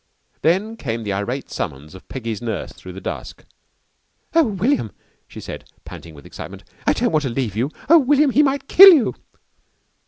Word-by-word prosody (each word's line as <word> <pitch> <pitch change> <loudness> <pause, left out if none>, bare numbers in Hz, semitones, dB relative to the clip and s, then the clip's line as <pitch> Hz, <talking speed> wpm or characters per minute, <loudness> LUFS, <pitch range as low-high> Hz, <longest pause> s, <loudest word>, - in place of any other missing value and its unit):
Then 205 +7 0
came 115 - -4
the 100 -2 -3
irate 120 +8 -4
summons 70 +4 -6
of 95 - -14
Peggy's 115 -5 -5
nurse 110 -5 -5
through 90 - -12
the 95 - -8
dusk. - - -7 0.9
"Oh, 330 0 +5
William," 210 - -1 0.4
she - - -11
said - - -9 0.2
panting 80 -2 -11
with 70 - -15
excitement, - - -10 0.2
"I - - +4
don't - - 0
want 155 -1 +2
to 135 - -3
leave 115 -4 -3
you. 120 +6 -1 0.2
Oh, 330 +3 +7
William, 285 +1 +3
he 285 - +4
might 275 -1 0
kill 390 +2 +10
you!" 300 -9 +3
135 Hz, 180 wpm, -20 LUFS, -, 0.9 s, kill